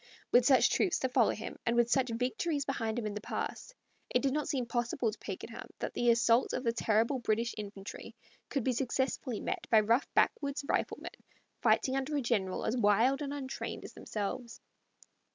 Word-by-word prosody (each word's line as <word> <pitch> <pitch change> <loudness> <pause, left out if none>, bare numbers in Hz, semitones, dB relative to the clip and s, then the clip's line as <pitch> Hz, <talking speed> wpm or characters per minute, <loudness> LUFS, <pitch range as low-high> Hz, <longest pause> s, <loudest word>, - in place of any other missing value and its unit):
With 245 0 +6
such 265 -2 +5
troops 370 - +2
to 260 - -1
follow 250 -3 +4
him, 220 - -4
and 235 - +1
with 240 0 +3
such 260 -2 +3
victories 255 +6 -1
behind 225 -5 -2
him 235 - -2
in 210 - -2
the 210 - -5
past, - - -5 0.3
it 250 - +1
did 270 -1 +2
not 300 0 -1
seem 260 -4 0
possible 240 0 -1
to 215 - -11
Pakenham - - -7
that - - -4
the 240 - +2
assault 235 +1 +4
of 255 - -2
the 230 -2 +1
terrible 230 +3 +1
British 230 0 0
infantry 200 -2 -8 0.3
could 275 - -1
be 255 - +1
successfully 260 -1 -1
met - - -3
by 220 - +7
rough 230 +6 +1
backwoods 280 -1 +1
riflemen - - -1 0.5
fighting 260 - +3
under 270 +2 -1
a - - +1
general 200 -7 0
as 225 - 0
wild 235 +5 +3
and 280 -1 -3
untrained 275 -2 -5
as - - -10
themselves. 225 +3 -5
240 Hz, 190 wpm, -32 LUFS, 225-270 Hz, 0.5 s, by